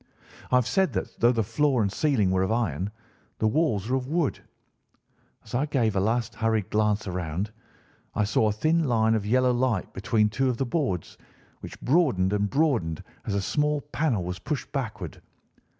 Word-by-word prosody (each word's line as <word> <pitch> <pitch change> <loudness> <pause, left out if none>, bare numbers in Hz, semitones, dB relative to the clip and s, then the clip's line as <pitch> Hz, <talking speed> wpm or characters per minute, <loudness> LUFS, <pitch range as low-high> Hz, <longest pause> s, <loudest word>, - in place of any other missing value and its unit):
"I - - +4
have 125 -2 +4
said 190 +10 +1
that - - -4
though 120 +1 +5
the 115 -2 +1
floor 125 +3 +1
and 100 - 0
ceiling 110 -7 +1
were 95 0 +2
of 95 +3 0
iron, 100 - 0 0.5
the - - -1
walls 110 - +1
were 130 +2 +1
of 130 -1 -4
wood. 160 -1 0 1.0
As 110 - -14
I 135 +5 +1
gave 120 -8 +1
a - - +3
last 115 +3 0
hurried 110 -3 0
glance 105 0 +1
around, 90 +2 -3 0.6
I 105 - +2
saw 105 +2 +2
a - - +2
thin 155 +10 +1
line 110 -3 +3
of 105 -2 -1
yellow 125 +2 +3
light 120 -5 0
between 105 +2 +1
two 130 +5 0
of 125 - -1
the 135 - 0
boards, 120 - -2 0.4
which - - -9
broadened 125 - +2
and 105 0 +1
broadened 120 - +1 0.2
as 100 - -2
a 100 - +1
small 150 +5 +1
panel 145 - -1
was 90 +1 -4
pushed 145 - -4
backward. 110 - -4
115 Hz, 185 wpm, -26 LUFS, 100-135 Hz, 1.0 s, though